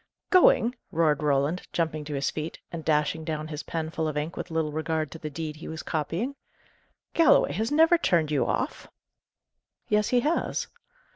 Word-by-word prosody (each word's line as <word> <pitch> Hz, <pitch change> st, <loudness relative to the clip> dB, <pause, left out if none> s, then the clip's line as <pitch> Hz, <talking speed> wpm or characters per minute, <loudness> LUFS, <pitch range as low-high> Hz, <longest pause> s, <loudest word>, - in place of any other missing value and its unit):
"Going!" 245 Hz, -10 st, +5 dB, 0.2 s
roared 155 Hz, -3 st, +2 dB
Roland, 145 Hz, +4 st, +1 dB
jumping 155 Hz, -2 st, -1 dB
to 145 Hz, -1 st, -4 dB
his 140 Hz, 0 st, 0 dB
feet, 155 Hz, +1 st, -5 dB
and 165 Hz, -2 st, -5 dB
dashing 155 Hz, +1 st, +1 dB
down 155 Hz, -1 st, -4 dB
his 150 Hz, -1 st, -4 dB
pen 160 Hz, -1 st, -4 dB
full 160 Hz, -1 st, -1 dB
of 150 Hz, -1 st, -3 dB
ink, 150 Hz, +3 st, -3 dB
with -, -, -5 dB
little 160 Hz, -2 st, -1 dB
regard 155 Hz, -1 st, -2 dB
to 165 Hz, -, -9 dB
the 155 Hz, -, -5 dB
deed 155 Hz, 0 st, -5 dB
he 160 Hz, -, -9 dB
was 160 Hz, 0 st, -6 dB
copying. 170 Hz, -, -2 dB, 0.8 s
"Galloway 330 Hz, -, +5 dB
has 220 Hz, -, -1 dB
never 325 Hz, +3 st, +5 dB
turned 165 Hz, -, +2 dB
you 145 Hz, -, +2 dB
off!" -, -, -2 dB, 1.0 s
"Yes, 210 Hz, 0 st, +3 dB
he 245 Hz, -1 st, +3 dB
has." 310 Hz, +6 st, 0 dB
160 Hz, 180 wpm, -27 LUFS, 150-175 Hz, 1.0 s, Going